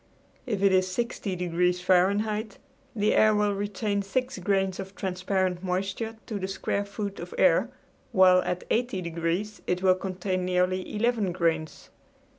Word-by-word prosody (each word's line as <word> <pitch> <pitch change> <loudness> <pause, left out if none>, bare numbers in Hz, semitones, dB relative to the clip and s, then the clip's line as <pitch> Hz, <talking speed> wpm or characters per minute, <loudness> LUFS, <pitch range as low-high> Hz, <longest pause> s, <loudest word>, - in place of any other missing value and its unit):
If 205 -5 -1
it 200 - +5
is 185 0 +2
60 230 -2 -2
degrees 180 0 0
Fahrenheit 200 +4 +1 0.4
the 210 -1 +2
air 215 0 +5
will 210 -1 +2
retain 205 +1 -2
six 255 +6 -2
grains 195 -2 0
of 195 0 -7
transparent 185 -1 -1
moisture 195 +5 -2
to 210 -3 -4
the 190 - -3
square 200 +1 -2
foot 200 0 -5
of 475 - -7
air, - - +4 0.4
while 185 -1 +6
at 180 0 -3
80 235 -5 0
degrees 170 +5 -2
it 180 +1 -1
will 185 -1 +6
contain 185 0 -3
nearly 180 +1 0
eleven 220 -3 +1
grains. 165 -3 -2
190 Hz, 150 wpm, -27 LUFS, 180-210 Hz, 0.4 s, while